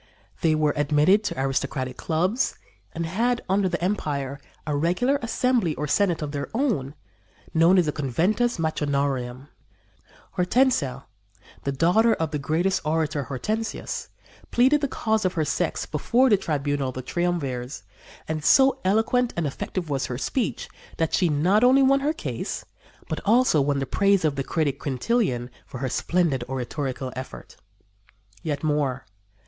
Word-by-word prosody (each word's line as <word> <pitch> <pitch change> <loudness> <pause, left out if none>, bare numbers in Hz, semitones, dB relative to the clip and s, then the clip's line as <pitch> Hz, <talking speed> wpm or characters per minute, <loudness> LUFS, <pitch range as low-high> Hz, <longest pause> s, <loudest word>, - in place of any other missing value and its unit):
They 160 -4 +3
were 155 -1 +2
admitted 150 +8 +3
to 130 - -3
aristocratic 135 -1 -1
clubs 180 - 0 0.4
and 165 0 -3
had, 235 +8 0
under 190 0 +2
the 175 - -2
empire, 145 -8 -2 0.3
a 150 -2 -1
regular 180 - +1
assembly 235 -7 +1
or 150 - -3
senate 175 +1 +1
of 145 - -4
their 140 -1 -4
own, 200 - 0 0.6
known 165 +4 +5
as 180 - +4
the 150 - 0
Conventus 180 - 0
Matronarum. 140 -5 -1 0.9
Hortensia, 180 - +2 0.6
the 140 - +1
daughter 180 - +3
of 160 -2 -2
the 150 - -2
great 165 +7 0
orator 155 -2 0
Hortensius, 215 - -3 0.4
pleaded 265 +5 +4
the 285 - +1
cause 220 -4 0
of 185 -1 +1
her 160 -3 0
sex 155 +3 -1
before 235 - +2
the - - +8
tribunal 145 -6 -1
of - - -8
the 130 - -5
triumvirs, 135 - -2 0.4
and 155 -1 -3
so 270 - +5
eloquent 225 +5 +2
and 170 - 0
effective 165 +5 -4
was 135 -1 -1
her 125 - -4
speech 235 - -2 0.3
that 165 -1 0
she 180 - +3
not 180 +9 +3
only 260 +2 +6
won 275 +1 +4
her 290 +2 +1
case, 320 - -5 0.4
but - - -3
also 225 - +4
won 140 0 +1
the 135 - -1
praise 195 +5 +2
of 150 -2 +1
the 135 - -2
critic, 150 -1 -1
Quintilian, 130 - -1 0.2
for - - -8
her 130 +1 -2
splendid 160 -2 0
oratorical 130 0 -3
effort. 130 0 -8 0.9
Yet 145 -2 -3
more. 145 -5 0
160 Hz, 155 wpm, -25 LUFS, 140-205 Hz, 0.9 s, the